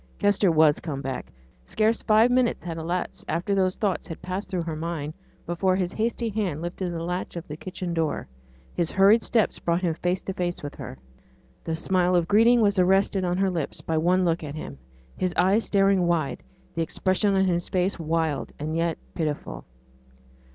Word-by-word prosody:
Kester 205 Hz, -2 st, +3 dB
was 155 Hz, -2 st, +4 dB
come 150 Hz, -5 st, -4 dB
back. 130 Hz, -, -5 dB, 0.3 s
Scarce 220 Hz, -, +1 dB
five 220 Hz, +3 st, +4 dB
minutes 250 Hz, -5 st, +1 dB
had 165 Hz, -1 st, -4 dB
elapsed 175 Hz, +3 st, -3 dB
after 170 Hz, +5 st, 0 dB
these 185 Hz, -1 st, +2 dB
thoughts 200 Hz, -4 st, -1 dB
had 165 Hz, -, -7 dB
passed 185 Hz, +3 st, -5 dB
through 180 Hz, -3 st, -1 dB
her 165 Hz, -1 st, -4 dB
mind 155 Hz, -2 st, -4 dB, 0.3 s
before 185 Hz, +2 st, +1 dB
his 180 Hz, -2 st, -1 dB
hasty 230 Hz, +1 st, -1 dB
hand 195 Hz, -8 st, -2 dB
lifted 175 Hz, +2 st, -4 dB
the 165 Hz, -1 st, -4 dB
latch 180 Hz, +2 st, -3 dB
of 170 Hz, -, -6 dB
the 150 Hz, -, -6 dB
kitchen 180 Hz, +1 st, -5 dB
door, 160 Hz, -, -1 dB, 0.5 s
his 170 Hz, -2 st, -1 dB
hurried 200 Hz, +4 st, +5 dB
steps 225 Hz, -4 st, +1 dB
brought 170 Hz, +2 st, 0 dB
him 170 Hz, -2 st, +1 dB
face 180 Hz, +3 st, -1 dB
to 190 Hz, -, -4 dB
face 175 Hz, -3 st, -3 dB
with 145 Hz, -, -5 dB
her. -, -, -8 dB, 0.7 s
The 165 Hz, -, -2 dB
smile 180 Hz, +1 st, +1 dB
of 170 Hz, -2 st, +2 dB
greeting 230 Hz, +4 st, +5 dB
was 205 Hz, -2 st, +3 dB
arrested 190 Hz, +1 st, +3 dB
on 180 Hz, 0 st, 0 dB
her 195 Hz, 0 st, +2 dB
lips 165 Hz, -5 st, -3 dB
by 160 Hz, -1 st, -1 dB
one 180 Hz, +3 st, +3 dB
look 165 Hz, -1 st, 0 dB
at 145 Hz, -1 st, -6 dB
him: 70 Hz, -, -7 dB, 0.4 s
his 180 Hz, -1 st, -1 dB
eyes 195 Hz, +5 st, +3 dB
staring 195 Hz, -3 st, +3 dB
wide, 155 Hz, -7 st, 0 dB, 0.3 s
the 165 Hz, -, -2 dB
expression 190 Hz, +4 st, +1 dB
on 190 Hz, 0 st, +3 dB
his 175 Hz, -2 st, 0 dB
face 185 Hz, 0 st, 0 dB
wild, 160 Hz, -2 st, -1 dB
and 155 Hz, +2 st, -3 dB
yet 165 Hz, -1 st, 0 dB, 0.2 s
pitiful. 155 Hz, -3 st, -3 dB
180 Hz, 190 wpm, -25 LUFS, 165-195 Hz, 0.7 s, hurried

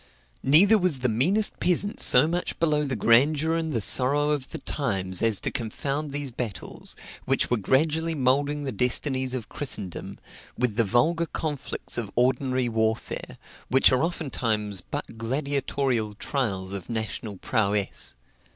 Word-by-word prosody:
Neither 195 Hz, +11 st, +6 dB
was 175 Hz, -8 st, +1 dB
the 125 Hz, -, +1 dB
meanest 180 Hz, -, +1 dB
peasant 190 Hz, +3 st, +1 dB
so 130 Hz, +5 st, +6 dB
much 175 Hz, +2 st, -2 dB
below 150 Hz, -2 st, +1 dB
the 135 Hz, -2 st, -2 dB
grandeur 145 Hz, +9 st, +3 dB
and 165 Hz, -1 st, -1 dB
the 115 Hz, -6 st, -1 dB
sorrow 145 Hz, +7 st, +4 dB
of 145 Hz, -3 st, -2 dB
the -, -, -6 dB
times 95 Hz, -10 st, -2 dB
as 110 Hz, -3 st, +2 dB
to -, -, -2 dB
confound 140 Hz, +6 st, -3 dB
these 140 Hz, -1 st, -3 dB
battles, 115 Hz, -7 st, -6 dB, 0.3 s
which -, -, +1 dB
were 125 Hz, -, +3 dB
gradually 155 Hz, +9 st, +1 dB
moulding 145 Hz, +2 st, +1 dB
the 135 Hz, -, -3 dB
destinies 130 Hz, +3 st, 0 dB
of 120 Hz, -4 st, -5 dB
Christendom, 105 Hz, -, -5 dB, 0.4 s
with 120 Hz, -3 st, 0 dB
the 115 Hz, -, +3 dB
vulgar 155 Hz, -, +1 dB
conflicts 150 Hz, -6 st, -4 dB
of 110 Hz, -4 st, -4 dB
ordinary 130 Hz, 0 st, +1 dB
warfare, 110 Hz, -1 st, -2 dB, 0.3 s
which 130 Hz, +1 st, +5 dB
are 130 Hz, -1 st, +2 dB
oftentimes 115 Hz, -, -2 dB
but 115 Hz, -, -7 dB
gladiatorial 130 Hz, -3 st, -1 dB
trials 100 Hz, -7 st, -2 dB
of 100 Hz, +1 st, -7 dB
national 110 Hz, -2 st, -4 dB
prowess. 105 Hz, -2 st, 0 dB
130 Hz, 145 wpm, -25 LUFS, 110-150 Hz, 0.4 s, Neither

